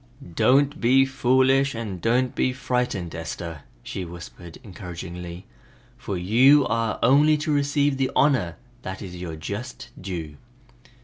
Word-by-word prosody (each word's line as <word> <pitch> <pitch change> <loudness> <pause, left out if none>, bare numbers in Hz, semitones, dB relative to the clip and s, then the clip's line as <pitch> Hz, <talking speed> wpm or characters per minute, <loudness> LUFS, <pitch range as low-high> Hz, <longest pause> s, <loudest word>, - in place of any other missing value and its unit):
"Don't 140 - +3
be 130 +3 +5
foolish 130 +1 +2
and 105 -6 -5
don't 125 +2 +1
be 130 - 0
frightened, 125 -9 -2
Esther," 80 -1 -6 0.2
she 95 - -5
whispered 85 0 -10
encouragingly, 90 -2 -8 0.5
"for 100 - -5
you 130 +10 +5
are 115 -1 -1
only 145 +5 +5
to 150 0 -1
receive 145 -1 +1
the 135 -1 0
honor 105 - +2 0.3
that 95 -2 -6
is 90 -2 -8
your 85 -3 -6
just 100 +10 -7
due!" 85 -6 -6
115 Hz, 130 wpm, -24 LUFS, 90-135 Hz, 0.5 s, be